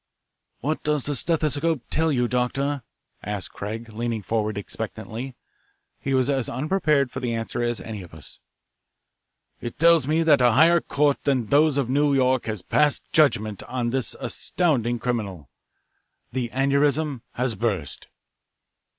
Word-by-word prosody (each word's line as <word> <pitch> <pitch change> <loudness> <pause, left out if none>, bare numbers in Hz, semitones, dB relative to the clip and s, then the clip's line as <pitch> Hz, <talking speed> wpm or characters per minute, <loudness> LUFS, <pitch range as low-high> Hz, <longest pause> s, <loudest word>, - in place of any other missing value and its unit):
"What 155 +5 -1
does 150 -2 0
the 145 - 0
stethoscope 155 -2 0
tell 160 0 +2
you, 125 -3 +1
Doctor?" 135 +3 -1 0.4
asked 105 -2 -5
Craig, 110 +3 -6
leaning 115 -1 -3
forward 110 0 -1
expectantly. 120 +5 -6 0.6
He 135 -1 -1
was 130 -1 +2
as 135 -4 0
unprepared 150 -1 +1
for 130 - -5
the 120 -3 -2
answer 115 +1 -3
as 120 -2 -1
any 105 +1 -7
of 90 - -12
us. 80 -2 -10 1.2
"It 120 - -6
tells 165 -4 +5
me 160 +2 +2
that 150 -5 +5
a 120 -2 +5
higher 165 +6 +5
court 145 -1 +1
than 135 -5 +1
those 145 +1 +4
of 135 -4 +1
New 140 +2 +2
York 130 -1 +2
has 105 -4 -3
passed 150 -1 +1
judgment 110 - +2
on 120 -2 -3
this 130 -1 0
astounding 125 -9 +1
criminal. 105 - -4 0.8
The 125 -1 -2
aneurism 140 +1 +1
has 125 -1 0
burst." 100 - -3
130 Hz, 145 wpm, -24 LUFS, 115-145 Hz, 1.2 s, tells